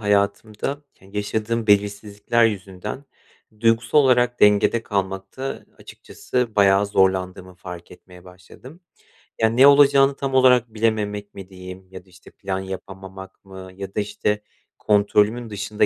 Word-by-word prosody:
hayatımda, 105 +6 -1
ke 95 - -21
yaşadığım 110 +2 -3
belirsizlikler 105 +2 +1
yüzünden 105 +4 -4 0.6
duygusal 115 +4 +2
olarak 125 -3 +2
dengede 105 +3 +4
kalmakta 95 +6 -4
açıkçası 125 -3 -5
bayağı 100 0 +4
zorlandığımı 95 -1 -1
fark 90 -1 -10
etmeye 90 0 -16
başladım. 95 - -15 0.6
Ya, 110 - +4
ne 125 +5 +5
olacağını 140 -1 +5
tam 135 -1 -4
olarak 125 -3 +4
bilememek 105 -2 -2
mi 95 -1 -11
diyeyim, 95 0 -11
ya 95 -1 -11
da, - - -25
işte, 90 0 -18
plan 95 -1 -5
yapamamak 95 0 -10
mı, 95 -1 -11
ya 95 0 -8
da, - - 0
işte, 105 0 -2 0.4
kontrolümün 105 +3 +1
dışında 105 +1 -1
105 Hz, 130 wpm, -21 LUFS, 95-115 Hz, 0.6 s, ne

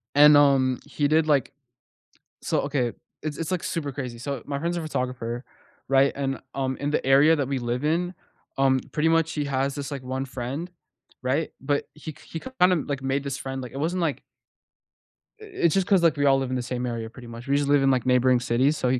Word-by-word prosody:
And, 150 0 +8
um, 135 -3 +4
he 145 0 0
did 155 +1 +3
like 140 -5 +2 0.9
so - - 0
okay. 135 -4 -1 0.3
It's 150 -1 -4
it's 165 - -3
like 180 -2 -1
super 145 -4 -3
crazy, 125 -3 -5
so 135 +1 -4
my 140 -1 -3
friend's 170 +3 -1
a - - -2
photographer, 125 -5 -3 0.5
right, 135 0 +4
and, 135 -1 -2 0.2
um, 130 -1 -1
in 145 - -2
the 150 - -1
area 140 +4 +6
that 140 -4 -1
we 140 -1 -1
live 120 +2 -2
in, 170 +4 0 0.4
um, 135 -1 +3
pretty 155 +1 +2
much 165 0 +2
he 150 - -1
has 135 0 -1
this 145 0 -5
like 140 -2 -5
one 130 +1 -3
friend. 135 +6 -5 0.5
Right, 135 +5 0
but 145 +1 -1
he 155 0 -8
k - - -19
he 165 - -5
kind 185 -5 +2
of, 165 -6 0
like, 140 -2 -3
made 135 +1 -1
this 140 -1 -2
friend 135 -2 -5
like, 125 -2 -8
it 135 - -5
wasn't 175 +5 -1
like 160 -4 -1 1.2
i - - -10
it's 380 - 0
just 195 -2 +1
'cause, 190 -4 +4
like, 165 -3 +4
all 140 -1 +4
live 135 -1 -2
in 130 - -1
the 125 - -1
same 125 0 -3
area 115 -2 -4
pretty 120 0 -12
much, 115 +3 -9
we 140 - +2
just 145 -1 0
live 145 -1 +4
in, 135 - +4
like, 130 -3 +1
neighboring 125 0 +4
cities, 130 +5 +1
so 125 - 0
he 130 0 +1
140 Hz, 230 wpm, -25 LUFS, 130-150 Hz, 1.2 s, And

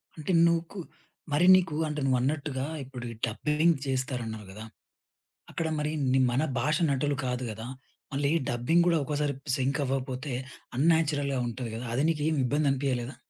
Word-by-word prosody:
అంటే 155 +3 -2
నుకు 170 +3 -1 0.5
మరి 155 +5 +3
నీకు 175 -5 +1
అంటే 150 -1 -3
నువ్వన్నట్టుగా 135 +1 0 0.2
ఇప్పుడు 125 -2 -8
ఈ - - -7
డబ్బింగ్ 150 +8 +2
జేస్తారు 130 -1 -1
అన్నావు 110 -2 -6
గదా! 110 +3 -9 0.9
అక్కడ 165 - -2
మరి 150 0 -1 0.2
ని 130 - +4
మన 130 +4 +1 0.2
భాష 150 +5 +1
నటులు 140 +1 +1
కాదు 125 0 -2
గదా! 110 +2 -7 0.5
మళ్ళీ 140 +1 +1 0.2
డబ్బింగ్ 120 +9 +2
కూడా 170 -2 +4
ఒక్కోసారి 145 0 -1 0.2
సింక్ 140 +2 0
అవ్వకపోతే 130 +1 -3 0.4
అన్‌నాచురల్‌గా 145 -3 +2
ఉంటది 120 0 -5
గదా! 120 +2 -5
అది 140 - +1
నీకేమి 155 -1 0
ఇబ్బందనిపియలేదా? 135 -2 0
140 Hz, 145 wpm, -28 LUFS, 130-150 Hz, 0.9 s, ని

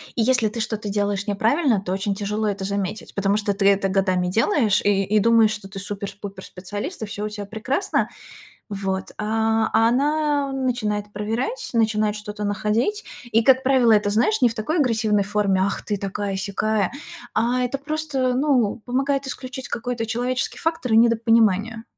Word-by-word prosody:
и 235 - +1
если 250 -1 +3
ты 230 - -6
что-то 215 -1 -3
делаешь 205 0 -1
неправильно, 225 - +2
то 185 - -5
очень 195 +1 -1
тяжело 210 +2 -2
это 200 -1 -2
заметить. 200 +1 -3
Потому 200 +1 +1
что 205 -1 0
ты 195 0 +1
это 195 -1 +2
годами 185 -2 +1
делаешь 220 - +2
и 200 -1 +2
и 210 +2 +2
думаешь, 225 0 +4
что 210 -2 -5
ты 195 0 -7
супер 200 0 -4
с - - -10
пупер 200 -2 -9
специалист 205 - -6
и 220 - -2
всё 205 0 -5
у 215 - -3
тебя 205 -1 -6
прекрасно. 220 - -1 0.6
Вот, 195 -2 -3
а 220 +1 +1
она 280 +5 +2
начинает 215 -6 -2
проверять, 225 - -3
начинает 215 -2 +1
что-то 210 0 -6
находить, 215 - 0 0.3
и, 225 +1 +3
как 260 +2 +5
правило, 255 -4 +4
это, 205 -1 +3
знаешь, 240 - +1
не 245 - +7
в 230 - -5
такой 235 +10 -2
агрессивной 220 -6 +2
форме 200 -2 +1
ах, 200 - -2
ты 205 - -1
такая-сякая, 200 +1 -1 0.4
а 245 +2 +1
это 250 +3 -2
просто, 285 -3 -1
ну, 250 -5 +1
помогает 275 +2 0
исключить 260 0 -6
какой-то 235 -1 -3
человеческий 245 +3 -2
фактор 325 -8 -1
и - - +5
недопонимание. 225 -1 +3
220 Hz, 170 wpm, -22 LUFS, 205-250 Hz, 0.6 s, не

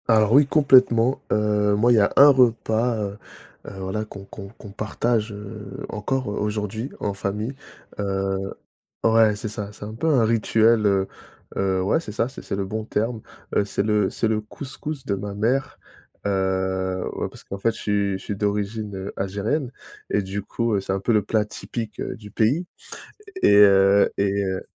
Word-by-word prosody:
Alors 110 -1 +4
oui 140 +1 +6
complètement. 130 -4 +4
Heu, 105 -1 +2
moi 115 +4 +3
il - - +6
y - - +5
a 100 - +3
un 140 +2 +9
repas, 120 -2 +3
heu, 100 -1 -4 0.5
heu, - - -6
voilà 95 +3 -3
qu'on 100 -2 -10
qu'on 100 0 -9
qu'on 105 -1 -13
partage, 110 +2 -1
heu, 105 -1 -8
encore 130 +5 -2
aujourd'hui, 105 +3 -3
en 100 - -2
famille. 105 +5 -3 0.5
Heu 95 -1 -2 0.5
ouais 115 -1 +5
c'est 110 - -4
ça, 105 -1 -6
c'est 105 - -10
un 110 - -7
peu 160 +8 -1
un 135 -7 +4
rituel, 115 0 +3
heu, 95 -1 +2 0.5
heu 95 -1 +1
ouais 95 - +2
c'est 135 -10 -7
ça, 115 +3 0
c'est 130 - -10
c'est - - -4
le 100 -1 -2
bon 110 +2 -4
terme. 110 +1 -2 0.3
Heu, 105 - +4
c'est 100 0 -1
le 105 -2 +1
c'est 115 - -1
le 110 -1 0
couscous 135 +4 -7
de 100 - 0
ma 100 +1 -5
mère, 120 +6 0 0.5
heu, 95 -1 -1
ouais - - -3
parce - - -14
qu'en 100 - -6
fait, 115 +3 +1
je - - -9
suis 100 -1 0
je - - -13
suis 105 - -4
d'origine 100 -1 -2
algérienne, 105 +8 -2 0.4
et 105 - +2
du 95 +2 -4
coup, 115 +1 -1
c'est 95 - -3
un 95 - -1
peu 115 - +1
le 105 - +3
plat 105 +1 0
typique 110 0 -6
du 105 -2 -7
pays, 135 - +1 0.8
et - - +6
heu, 100 0 +6
et 100 0 +1
heu, 95 -1 -2
105 Hz, 185 wpm, -23 LUFS, 100-115 Hz, 0.8 s, un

